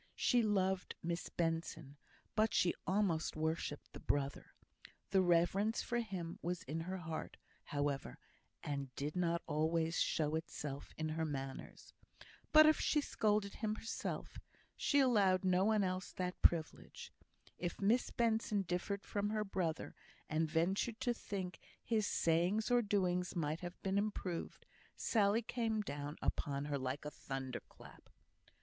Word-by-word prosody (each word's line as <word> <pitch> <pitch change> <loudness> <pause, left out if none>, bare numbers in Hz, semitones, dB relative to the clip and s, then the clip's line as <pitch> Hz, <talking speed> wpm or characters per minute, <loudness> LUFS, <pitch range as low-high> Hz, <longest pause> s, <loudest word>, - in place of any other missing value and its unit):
She 245 - +3
loved 190 -3 +1
Miss 170 +1 -2
Benson, 165 -4 -2 0.4
but 220 0 +2
she 175 - +4
almost 185 -5 +1
worshipped 155 -1 -2
the - - -8
brother. 140 -1 -2 0.6
The 190 -1 +5
reverence 185 +5 +3
for 240 -1 0
him 185 -7 -4
was 175 0 -2
in 155 +5 -3
her 185 +3 -3
heart, 160 -3 -5 0.3
however, 145 - -2 0.5
and 140 -2 -3
did 145 +3 -3
not 170 -1 +1
always 160 +2 +1
show 155 -1 +1
itself 150 -3 -4
in 155 0 -1
her 160 +1 -1
manners. 135 -3 -5 0.6
But 310 0 +9
if 310 0 +5
she 300 - +3
scolded 210 -7 +1
him 215 -1 -2
herself, 225 - -4 0.4
she 285 - +2
allowed 205 -9 +4
no 185 +1 +4
one 215 -1 +3
else 185 0 -2
that 180 -1 -3
privilege. 165 -2 +1 0.5
If 175 -1 -3
Miss 220 +5 +3
Benson 220 -3 +1
differed 185 +3 -2
from 205 0 -1
her 215 0 0
brother, 180 -5 -2 0.3
and 155 +1 0
ventured 190 +8 +1
to 245 -2 +2
think 190 -5 -5 0.2
his 220 -3 +1
sayings 175 +8 +2
or 245 0 +5
doings 180 -4 0
might 155 -1 -1
have 175 0 -7
been 195 +1 +2
improved, 195 -5 -3 0.3
Sally 215 +1 +2
came 225 -2 0
down 145 -5 -5
upon 140 0 -1
her 145 -1 -1
like 130 +3 -3
a 150 - -3
thunder 135 -3 -5
clap. - - -15
180 Hz, 145 wpm, -37 LUFS, 160-210 Hz, 0.6 s, But